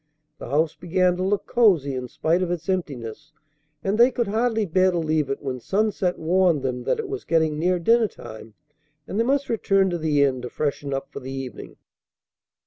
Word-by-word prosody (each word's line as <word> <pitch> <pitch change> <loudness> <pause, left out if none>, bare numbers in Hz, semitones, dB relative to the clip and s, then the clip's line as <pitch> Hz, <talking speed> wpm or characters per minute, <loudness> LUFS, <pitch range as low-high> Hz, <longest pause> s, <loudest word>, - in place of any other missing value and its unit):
The - - -8
house 155 +3 +1
began 180 +1 +1
to 185 - -2
look 200 +1 0
cozy 185 - +3
in 125 -1 -4
spite 165 +8 0
of 180 - -1
its 175 0 -4
emptiness, 150 - -4 0.5
and 200 +3 0
they 240 +2 +7
could 240 -2 -1
hardly 225 0 +1
bear 185 +1 +3
to 180 - -1
leave 155 -3 0
it 135 - -3
when 130 -2 -3
sunset 195 - 0
warned 170 -3 +2
them 125 -2 -3
that - - +1
it 450 -2 -4
was 405 +1 -5
getting 160 -2 +1
near 180 +2 +2
dinner 225 +6 +3
time 110 - -11 0.5
and 200 - -3
they - - +4
must 275 +3 +1
return 195 -4 +2
to 175 - -2
the 150 -3 +2
inn 130 -2 +1
to 125 - -6
freshen 145 0 -3
up 135 0 -4
for - - -6
the 130 -1 -8
evening. 135 -4 -7
170 Hz, 205 wpm, -24 LUFS, 140-195 Hz, 0.5 s, they